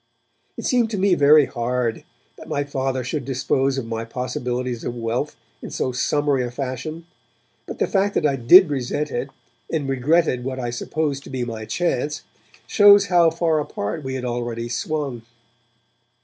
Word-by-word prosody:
It - - -6
seemed 240 -3 +2
to 215 - -3
me 195 0 +3
very 150 -2 +6
hard 120 -2 -2 0.3
that - - -12
my 145 - -1
Father 135 -2 -2
should 140 +4 -3
dispose 135 +1 0
of 130 - -3
my 115 0 -4
possibilities 125 0 -3
of 120 - -4
wealth 120 +5 -2 0.3
in - - -7
so 130 - -2
summary 140 +1 +1
a 120 - -3
fashion, 135 +6 -5 0.6
but - - -7
the - - +1
fact 200 +1 0
that - - +1
I 140 -2 +2
did 155 +8 +7
resent 140 +2 -2
it, 125 +3 -3 0.4
and 150 -4 -1
regretted 135 0 +1
what 130 0 -4
I 120 -1 -3
supposed 140 +3 -2
to - - -10
be 130 -2 -3
my 110 -2 -6
'chance', 150 -1 -1 0.4
shows 205 -1 +6
how 170 -2 +6
far 165 -1 +1
apart 145 -1 -4
we 130 0 -4
had 130 -1 -4
already 120 -1 -3
swung. 135 -1 -3
135 Hz, 170 wpm, -22 LUFS, 125-155 Hz, 0.6 s, did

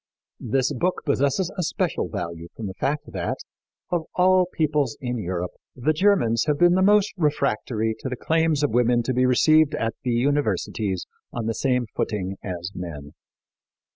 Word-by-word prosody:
This 130 +4 0
book 180 +8 -1
possesses 140 +6 +1
a - - +2
special 175 - -1
value 85 0 -5
from 115 - -5
the 95 - -4
fact 145 +8 -2
that, - - -2 0.5
of 170 -2 0
all 185 0 +4
peoples 150 -6 0
in 125 -3 -3
Europe, 90 -2 -3 0.2
the 140 +5 +1
Germans 155 - +3
have 150 -1 +2
been 175 +1 +5
the 185 - +3
most 205 +1 +4
refractory 110 -7 0
to 130 - -4
the 125 - -3
claims 160 +1 +1
of 145 - +2
women 120 0 +3
to 130 - -1
be 125 +1 +3
received 155 +4 +4
at 115 -1 -1
the 125 - -1
universities 115 -7 0 0.3
on 120 -2 -4
the 115 - 0
same 125 0 +1
footing 95 -3 -2
as 90 -1 -5
men. 75 -5 -7
130 Hz, 170 wpm, -24 LUFS, 110-155 Hz, 0.5 s, been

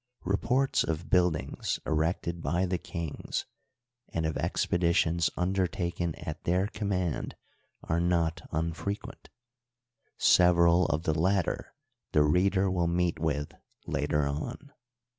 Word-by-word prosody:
Re 100 - +1
ports 130 +5 +1
of 80 0 -3
buildings 90 -4 +1
erected 85 +2 -1
by 90 +3 +1
the 90 -1 -1
kings, 85 -4 -4 0.6
and 80 -1 -2
of 80 - -1
expeditions 85 -1 +1
undertaken 90 -2 -1
at 75 0 -7
their 90 +3 +2
command, 100 -6 -2 0.5
are 80 - 0
not 85 -2 +1
unfrequent; 85 +5 -4 0.9
several 85 0 +5
of 80 0 -1
the 80 - +1
latter 90 +3 0 0.4
the 75 - +5
reader 95 +5 +3
will 90 -2 +1
meet 85 -1 0
with 75 -2 -1 0.3
later 75 0 0
on. 120 - -5
85 Hz, 115 wpm, -29 LUFS, 80-90 Hz, 0.9 s, several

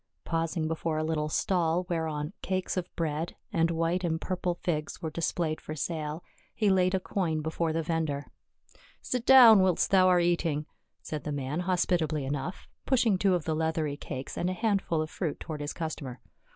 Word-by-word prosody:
Pausing 165 -1 -1
before 160 0 -2
a 155 - 0
little 155 -1 -1
stall 175 +1 +1
whereon 160 -2 -2
cakes 185 -1 -2
of 185 -1 -2
bread, 160 0 -2 0.2
and 165 0 +3
white 165 +2 0
and 160 -2 0
purple 180 -1 -2
figs 155 -3 -3
were 160 - -4
displayed 165 -1 -1
for 155 - -6
sale, 155 +1 -3 0.3
he 210 -3 +3
laid 185 0 +3
a - - +1
coin 175 -5 -1
before 160 +1 -1
the 165 +1 -1
vendor. 155 -3 -1 0.8
"Sit 250 -1 -2
down 245 -5 +9
whilst 185 -3 +2
thou 185 -1 +6
art 180 -1 +4
eating," 165 -3 0 0.4
said 150 -3 -5
the 150 - -3
man 145 +2 -2
hospitably 170 -5 0
enough, 145 +6 -4 0.2
pushing 235 -7 +3
two 190 -2 +3
of 170 -4 -3
the 160 - 0
leathery 160 -2 -1
cakes 130 -2 -6
and 180 - 0
a - - -1
handful 195 -6 0
of 155 - -8
fruit 165 -6 -3
toward 155 -3 -6
his 145 - -3
customer. 145 -6 -5
165 Hz, 180 wpm, -29 LUFS, 155-180 Hz, 0.8 s, down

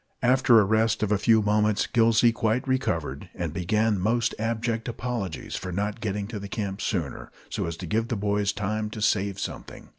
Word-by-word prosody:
After 125 -2 +5
a - - +5
rest 110 +2 +2
of 105 - 0
a 105 - +3
few 110 0 +4
moments, 105 0 +2
Gillsey 115 0 +4
quite 115 +3 0
recovered, 85 - -1
and 85 -3 -3
began 105 +4 +1
most 115 +4 +1
abject 115 +1 -1
apologies 115 - -4
for 90 - -5
not 105 +4 -2
getting 105 -2 -2
to 110 -3 -5
camp 100 -1 -4
sooner, 85 - -3 0.2
so - - -2
as 85 0 -5
to 90 - -6
give 110 +7 0
the 120 - -2
boys 100 0 +1
time 105 +1 -2
to 110 - -7
save 100 -2 +1
something. - - -7
105 Hz, 185 wpm, -26 LUFS, 100-115 Hz, 0.2 s, After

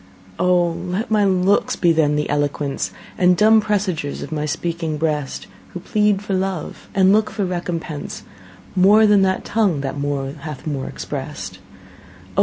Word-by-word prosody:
O! 180 -1 +3
let 185 +7 -4
my 210 -1 +4
looks 190 +1 +2
be 175 -2 +3
then 155 -2 +2
the 150 0 0
eloquence 145 -1 -1 0.3
And 180 -1 +4
dumb 220 +3 +6
presagers 190 -9 -2
of 145 - -8
my 150 -1 -2
speaking 165 0 -2
breast, 150 -3 -2 0.3
Who - - -3
plead 210 +1 +1
for 205 - -3
love, 185 -3 -3
and 190 0 +5
look 215 0 +3
for 205 -3 -2
recompense, 170 -4 -4 0.5
More 205 +4 +6
than 205 -2 +5
that 190 -1 +1
tongue 200 -10 +1
that 140 +1 -4
more 140 -1 -2
hath 150 -2 -8
more 140 -4 -3
express'd. - - -6
O! - - -28
180 Hz, 160 wpm, -20 LUFS, 150-195 Hz, 0.5 s, dumb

